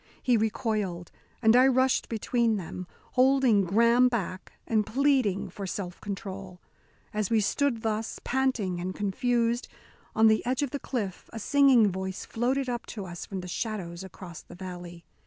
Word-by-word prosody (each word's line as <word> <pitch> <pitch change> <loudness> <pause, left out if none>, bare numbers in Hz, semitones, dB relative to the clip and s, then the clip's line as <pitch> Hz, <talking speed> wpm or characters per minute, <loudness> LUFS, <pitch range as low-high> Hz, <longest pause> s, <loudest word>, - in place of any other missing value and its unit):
He 250 -2 +4
recoiled, 210 -5 -1 0.3
and 220 +1 +6
I 255 +1 +7
rushed 260 0 +2
between 230 0 +1
them, 180 -1 -6 0.2
holding 255 -5 +4
Graham 235 +6 +4
back, 195 -6 -3
and 220 -2 +2
pleading 220 -7 +1
for 195 +1 -6
self 180 -1 -5
control. 195 -2 -6 0.5
As 210 -2 -1
we 225 - +3
stood 235 +2 0
thus, 220 0 -2
panting 240 -9 0
and 185 +1 -4
confused, 235 +4 0 0.5
on 220 - +5
the 220 0 +5
edge 255 +3 0
of 275 - -2
the 285 - -3
cliff, 210 -11 -4
a - - -7
singing 255 -3 +5
voice 190 0 -4
floated 255 +4 0
up 240 -1 -3
to 205 -4 -6
us 175 -1 -7
from 190 -2 -4
the 180 - -8
shadows 180 -3 -4
across 180 -3 -10
the - - -13
valley. 175 -2 -8
215 Hz, 160 wpm, -28 LUFS, 190-245 Hz, 0.5 s, I